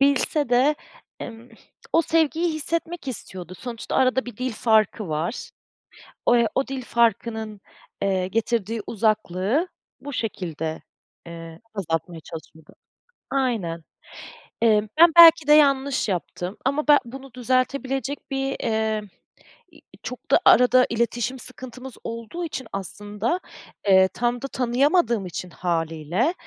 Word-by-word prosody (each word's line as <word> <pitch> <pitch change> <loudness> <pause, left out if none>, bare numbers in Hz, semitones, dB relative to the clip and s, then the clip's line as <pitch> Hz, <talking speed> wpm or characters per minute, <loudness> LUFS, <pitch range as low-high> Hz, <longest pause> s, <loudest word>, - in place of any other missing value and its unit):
bilse 280 0 +2
de, 260 +5 +4 0.5
emm, 230 +1 -9 0.4
o 330 - +4
sevgiyi 325 +1 +1
hissetmek 330 0 -3
istiyordu. 185 -7 -7
Sonuçta 240 -3 -5
arada 260 0 +2
bir 245 -4 -8
dil 255 0 -2
farkı 215 -2 +2
var. 160 +9 -3 0.8
O 240 - +5
e, 235 -1 +3
o 270 - +1
dil 270 -1 -4
farkının, 220 -2 0 0.4
eee, 190 -2 0
getirdiği 225 0 -1
uzaklığı 215 - 0 0.3
bu 285 0 -7
şekilde, 165 - -4 0.5
ııı, 165 -1 -9 0.2
azaltmaya 165 -3 -3
çalışıyordu. 160 -1 -12 0.6
Aynen. 215 - -1 0.8
Iıı, 215 -2 +3
ben 340 0 +8
belki 330 -3 +9
de 300 - +7
yanlış 275 -5 +3
yaptım, 180 +1 -4
ama 290 +3 0
ben 295 -1 +8
bunu 265 +1 -10
düzeltebilecek 265 +2 -1
bir, 270 0 -1
eee, 220 -1 0 0.7
iii, - - -19 0.2
çok - - -8
da - - +6
arada 250 0 +6
iletişim 235 +2 -1
sıkıntımız 255 0 -5
olduğu 230 +10 -5
için 265 -4 -6
aslında, 205 - -2 0.5
eee, 190 -1 +6
tam 240 0 -1
da 275 - -3
tanıyamadığım 255 - +1
için 180 0 -6
hâliyle, 170 - -1
235 Hz, 120 wpm, -24 LUFS, 195-270 Hz, 0.8 s, belki